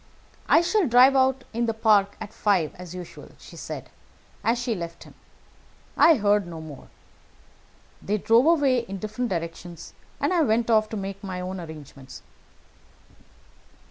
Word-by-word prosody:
'I - - +6
shall 360 +1 +1
drive 255 +3 +6
out 265 0 +2
in 235 +1 -1
the 225 - -1
park 210 -3 +2
at 220 0 -8
five 190 -7 +1
as 180 -1 -10
usual,' 180 -2 -10
she - - -14
said, - - -8 0.5
as 230 +2 +1
she 240 -1 -2
left 170 -4 -7
him. - - -16 0.8
I 330 - +6
heard 205 -4 +1
no 165 -2 -8
more. 155 -4 -11 1.1
They 210 +2 -1
drove 230 +7 +3
away 285 -6 +3
in 195 -4 -6
different 220 +4 -4
directions, 170 -1 -6 0.3
and - - 0
I 345 - +3
went 230 -3 +1
off 215 -1 +3
to 220 - -5
make 195 +1 -6
my 185 -2 -5
own 185 +1 -5
arrangements." 145 -5 -11
210 Hz, 155 wpm, -25 LUFS, 180-240 Hz, 1.1 s, I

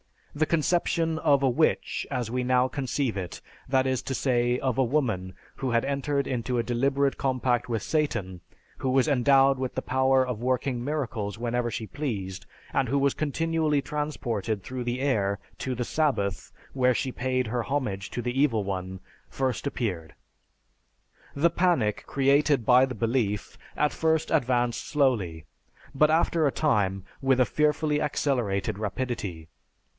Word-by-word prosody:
The 155 +1 0
conception 165 0 +1
of 140 -4 +3
a 135 - +4
witch, 155 +6 0
as 125 -5 -2
we 125 0 -1
now 125 0 +3
conceive 130 -3 -2
it, 90 -3 -5 0.3
that 130 0 +2
is 130 -1 0
to 135 - -3
say 120 -2 +1
of 130 -2 -1
a 135 - +4
woman 115 -9 -1 0.2
who 130 -2 -2
had 115 0 +2
entered 140 0 -1
into 125 0 -2
a 120 - +1
deliberate 135 +3 +1
compact 125 -2 0
with 115 -3 -1
Satan, 105 - -1 0.4
who 130 - -2
was 130 +2 +3
endowed 135 0 +4
with 130 -1 -3
the - - -1
power 130 0 +2
of 125 -4 -4
working 125 0 -1
miracles 120 -8 -3
whenever 120 +1 -1
she 110 - -4
pleased, 105 -9 -4 0.3
and 130 - +1
who 140 +4 +1
was 140 0 +2
continually 155 0 0
transported 120 -9 -3
through 125 +2 -5
the 120 +2 -2
air 100 -8 +1 0.2
to 130 -1 -2
the 120 - -2
Sabbath, 115 - -1 0.2
where 125 -2 +3
she 130 - -1
paid 130 0 -1
her 120 +1 -1
homage 110 -9 -2
to 120 - -3
the 125 +2 -2
Evil 115 -8 +2
One 95 -1 -4 0.3
first 130 +1 -2
appeared. 90 - -3 1.2
The 165 +4 +3
panic 165 - +1
created 140 -1 +2
by 125 +1 +6
the 130 -1 -6
belief 110 -3 -1 0.2
at 150 0 +2
first 160 -1 0
advanced 125 -5 +1
slowly, 105 - 0 0.5
but 150 +2 +4
after 160 0 +2
a - - +1
time 100 - +1 0.2
with 135 -1 +3
a 125 - +5
fearfully 150 +1 +1
accelerated 110 -9 -1
rapidity. 105 -7 -4
130 Hz, 160 wpm, -27 LUFS, 115-140 Hz, 1.2 s, by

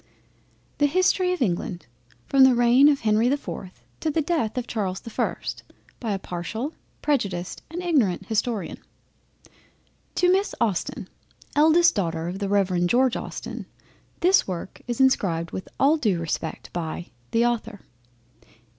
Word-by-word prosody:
THE 290 - +5
HISTORY 365 +3 +2
OF 360 -7 0
ENGLAND 175 -2 -2 0.4
FROM 275 -1 +5
THE 260 -1 +6
REIGN 245 +4 +6
OF 290 -2 +3
HENRY 220 +2 +3
THE 280 - +2
4TH 190 -9 -8 0.2
TO 320 - -1
THE 310 +1 0
DEATH 285 -9 -1
OF 250 - -1
CHARLES 195 -6 -3
THE 230 - -9
1ST - - -3 0.4
BY 225 -4 -2
A - - 0
PARTIAL, 195 - -5 0.3
PREJUDICED, 195 -12 -1
AND 350 +3 -5
IGNORANT 225 - +1
HISTORIAN. 220 -3 -2 1.4
To 360 0 +4
Miss 390 +2 +1
Austen, 210 -6 -1 0.5
eldest 320 +3 +5
daughter 165 -4 -2
of 185 +2 -4
the 200 -1 -2
Rev. 185 -3 +2
George 250 +5 +3
Austen, - - -6 0.5
this 365 +2 +4
work 185 0 -6
is 240 0 -3
inscribed 175 -11 +2
with 185 - -6
all 290 +4 +5
due 210 - +1
respect 165 -1 -4
by 170 0 -4 0.2
THE 230 +1 +2
AUTHOR. 225 -4 -2
230 Hz, 145 wpm, -25 LUFS, 185-285 Hz, 1.4 s, THE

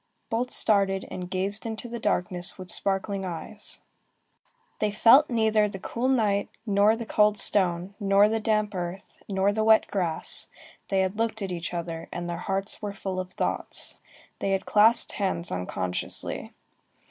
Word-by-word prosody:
Both 240 +2 0
started, 195 -5 +2
and 180 -1 -6
gazed 195 +3 -1
into 225 +1 -5
the 235 0 -6
darkness 180 -3 0
with 185 -2 -5
sparkling 195 0 -1
eyes. 190 +4 -7 1.0
They 210 - +1
felt 235 +8 +6
neither 220 -3 +2
the 195 - -6
cool 235 +6 -3
night, 215 -6 +1 0.2
nor 205 +1 +4
the 230 0 -6
cold 210 -1 +3
stone, 185 -2 +1
nor 200 0 +4
the 225 +1 0
damp 215 -1 0
earth, 180 +1 -6
nor 195 +1 +1
the 220 +1 0
wet 220 0 +5
grass; 175 -5 -1 0.4
they 190 -1 +2
looked 220 +2 -2
at 190 - -4
each 175 -1 -4
other, 170 -1 -5
and 175 0 -5
their 170 -1 -3
hearts 195 +1 -2
were 205 -1 -4
full 190 -2 -4
of 185 0 -5
thoughts. - - -2 0.4
They 195 - 0
had 190 0 -1
clasped 220 +3 +4
hands 185 -4 -2
unconsciously. 90 0 -2
200 Hz, 160 wpm, -26 LUFS, 185-215 Hz, 1.0 s, felt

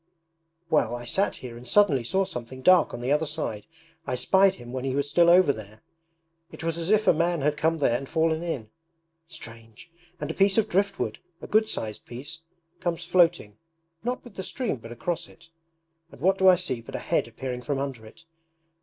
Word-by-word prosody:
'Well, 150 -5 +2
I 120 0 -7
sat 195 - +1
here 125 -2 -9
and 120 +1 -11
suddenly 150 -6 +4
saw 190 +10 +1
something 130 -2 -7
dark 185 +2 +6
on 120 - -6
the 125 +3 -1
other 150 +2 +2
side. 145 -9 -4 0.4
I 125 - -1
spied 190 +9 +4
him 120 -6 -11
when 130 -1 -3
he 135 -1 -1
was 140 0 0
still 170 +4 +4
over 175 -4 +6
there. 110 -1 -12 0.7
It - - -10
was 165 -1 -1
as 165 +2 -2
if 215 0 +3
a - - +7
man 170 0 0
had 150 +2 +1
come 160 +2 +1
there 135 -6 +2
and 135 +2 -4
fallen 160 0 +1
in. 135 -11 -4 0.6
Strange! 115 -2 -11 0.3
And 150 +1 -3
a - - -5
piece 195 +2 +3
of 220 - +3
driftwood, 200 0 -1 0.2
a - - -9
good 215 +1 +2
sized 110 -2 -4
piece, 140 +7 -7 0.4
comes 170 -2 -2
floating, 170 - +2 0.4
not 250 +2 -2
with 240 - -13
the - - -2
stream 225 - -3
but 115 0 -11
across 160 +8 -3
it; - - -19 0.6
and - - -14
what 190 +2 +2
do 190 - +5
I 185 - +9
see 145 -10 -2
but 115 - -9
a - - 0
head - - 0
appearing 125 -2 -5
from 140 +2 -2
under 135 -4 -4
it! 165 +10 -16
155 Hz, 205 wpm, -26 LUFS, 125-180 Hz, 0.7 s, I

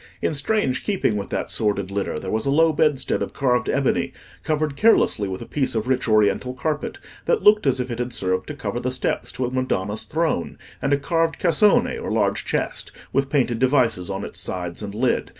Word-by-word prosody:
In - - 0
strange 140 - 0
keeping 195 - 0
with 100 -1 -4
that - - -3
sordid 100 -3 0
litter, 100 -5 -2
there 95 +4 -5
was 110 +5 -1
a - - +2
low 160 +3 +4
bedstead 150 -3 +1
of - - -3
carved 125 -4 +1
ebony, 135 -1 0 0.3
covered 155 -2 -1
carelessly 175 - +3
with 95 0 -5
a - - -10
piece 135 -5 -1
of 110 +1 -1
rich 130 -1 0
oriental 110 +4 +2
carpet, 150 +4 -3 0.3
that 480 - +1
looked 210 -6 +5
as 130 -1 +2
if 125 0 -3
it 120 - -4
had 125 0 -2
served 95 -3 -1
to 150 - -6
cover 115 -3 -3
the 125 - -2
steps 130 0 -1
to 130 - -2
a 125 - -3
Madonna's 110 -5 -1
throne; 160 - -2 0.2
and 135 - 0
a 140 - +4
carved 165 +3 0
cassone, 180 +4 +3
or - - -4
large - - 0
chest, - - -2 0.2
with 135 0 +1
painted 125 -5 +1
devices 125 -8 +2
on 95 0 -3
its - - -6
sides 90 -1 -1
and 105 -1 -6
lid. 125 +3 0
130 Hz, 210 wpm, -23 LUFS, 105-150 Hz, 0.3 s, looked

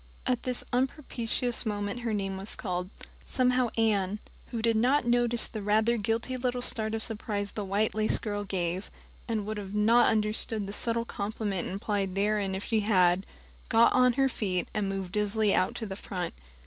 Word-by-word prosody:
At 250 -2 0
this 250 -1 +4
unpropitious 250 -2 0
moment 205 0 -3
her 235 -2 -2
name 195 -2 -2
was 195 +2 -3
called. 180 -2 -3 0.3
Somehow 250 -1 +1
Anne 210 -3 +1 0.3
who 235 - -4
did 230 0 +2
not 250 +4 +3
notice 240 -1 +3
the 215 - -5
rather 215 +3 +2
guilty 230 +4 -1
little 250 0 -2
start 220 -2 -1
of 220 - -1
surprise 210 -2 -2
the 210 - -4
white 200 +3 0
lace 215 0 +4
girl 205 -1 -3
gave, 185 -1 -3 0.4
and 220 -3 -2
would 215 0 -4 0.2
not 230 +3 +5
have - - +4
understood 215 0 +1
the 200 - -6
subtle 230 +1 0
compliment 205 -3 -3
implied 195 -1 -2
therein 200 -1 0
if 190 - -4
she 225 - +1
had 190 -3 +3 0.4
got 230 +1 +5
on 250 -1 +4
her 270 +2 +2
feet, 190 -8 -2
and 210 -2 -1
moved 195 -2 -4
dizzily 210 0 +1
out 185 - +1
to 225 - -4
the 195 -2 -5
front. 180 -3 -5
215 Hz, 180 wpm, -28 LUFS, 200-235 Hz, 0.4 s, not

